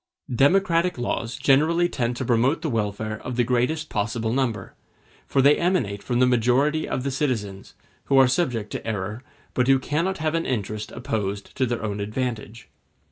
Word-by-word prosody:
Democratic 170 +4 +3
laws 120 -1 -2
generally 160 +5 +3
tend 120 -6 -2
to 130 - -3
promote 125 +7 +2
the 155 - -1
welfare 110 -1 -2
of 125 - -5
the 120 - +2
greatest 125 +6 0
possible 110 +1 -2
number; 125 -4 -1 0.5
for 135 - +2
they 145 +2 +6
emanate 130 - 0
from 120 - -2
the 125 - +5
majority 125 +6 +2
of 125 - -2
the 140 - -1
citizens, 110 -9 -3 0.3
who 135 - +2
are 135 -1 +7
subject 125 -7 -1
to - - -5
error, 105 +1 -3 0.3
but 125 0 +1
who 135 0 +6
cannot 165 +8 -1
have 155 -1 -1
an 165 0 -1
interest 105 -3 -3
opposed 100 -2 -4
to 130 - +1
their 120 -2 -3
own 105 -1 -3
advantage. 115 +1 -4
125 Hz, 175 wpm, -24 LUFS, 110-145 Hz, 0.5 s, are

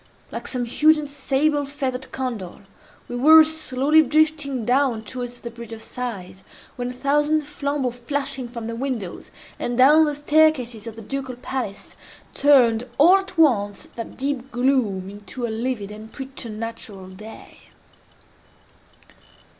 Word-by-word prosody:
Like - - -6
some 250 -2 -2
huge 310 +6 +4
and 300 -1 -4
sable 290 +1 0
feathered 265 -2 -4
condor, 225 -9 -5 0.4
we 245 - -6
were 315 +6 +8
slowly 310 -1 +2
drifting 295 -4 +1
down 250 -3 +2
towards 245 +2 -7
the 235 - -6
Bridge 235 -1 -9
of 225 - -7
Sighs, 195 -7 -6 0.3
when 245 0 -3
a - - -6
thousand 295 +4 +2
flambeaux 285 -3 -2
flashing 265 +1 -3
from 235 -2 -7
the 230 0 -4
windows, 235 -7 -4 0.3
and 240 0 -2
down 300 +5 +7
the 295 -1 -1
staircases 290 -7 +2
of 225 - -7
the 225 - -9
Ducal 260 +2 -4
Palace, 245 -5 -5 0.4
turned 250 -4 +4
all 345 +7 +7
at 385 -2 -7
once 205 -11 +2
that 230 - -7
deep 275 -1 -3
gloom 240 -7 +1
into 205 +5 -6
a - - -3
livid 225 -3 -3
and 215 +1 -10
preternatural 230 -6 -7
day. 210 +4 -12
255 Hz, 140 wpm, -23 LUFS, 230-285 Hz, 0.4 s, were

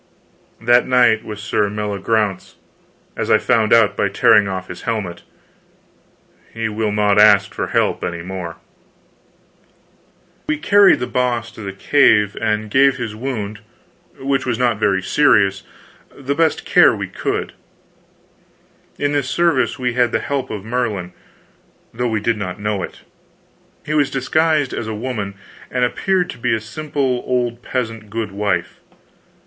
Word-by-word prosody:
That 120 +2 +3
knight 120 -4 +3
was 105 -1 -8
Sir 105 0 0
Meliagraunce, 105 -1 -2 0.6
as - - -3
I - - +6
found 110 -2 +1
out 115 -3 +5
by - - 0
tearing 105 -1 +4
off 95 -1 -4
his 90 - -9
helmet. 105 -7 -3 1.3
He 115 -1 -3
will 110 0 -2
not 105 -1 +2
ask 105 -1 +5
for - - -3
help - - 0
any 85 -1 -4
more. 90 -2 -6 1.9
We 155 - 0
carried 200 +5 +5
The - - 0
Boss 120 -2 -1
to 110 - -12
the 100 -2 -5
cave 105 -1 +3
and 105 0 -1
gave 135 +1 +4
his 115 -4 -4
wound, 110 -4 -4 0.6
which 135 0 -1
was 120 -3 -1
not 120 -3 +1
very 95 -3 +1
serious, 100 -6 +3 0.5
the 140 0 -3
best 160 0 0
care - - +5
we - - -4
could. - - -3 1.4
In 145 0 0
this 140 -3 -1
service 170 0 +1
we 125 -2 -1
had 120 -1 +2
the - - +1
help 135 -2 -3
of 105 -1 -6
Merlin, 110 -7 -2 0.8
though 120 +1 -1
we 110 -2 -1
did 115 +1 0
not 95 -2 -5
know 105 -1 -2
it. - - -7 0.8
He 155 - -3
was 145 -3 +2
disguised 150 +1 +1
as 110 - -4
a 110 - -4
woman, 105 -4 -4 0.3
and 125 -1 +1
appeared 180 +7 0
to - - -12
be 120 -1 +1
a - - -2
simple 135 +1 -2
old 120 -1 -1
peasant 115 -5 -4
goodwife. 105 -2 -2
115 Hz, 150 wpm, -19 LUFS, 105-130 Hz, 1.9 s, I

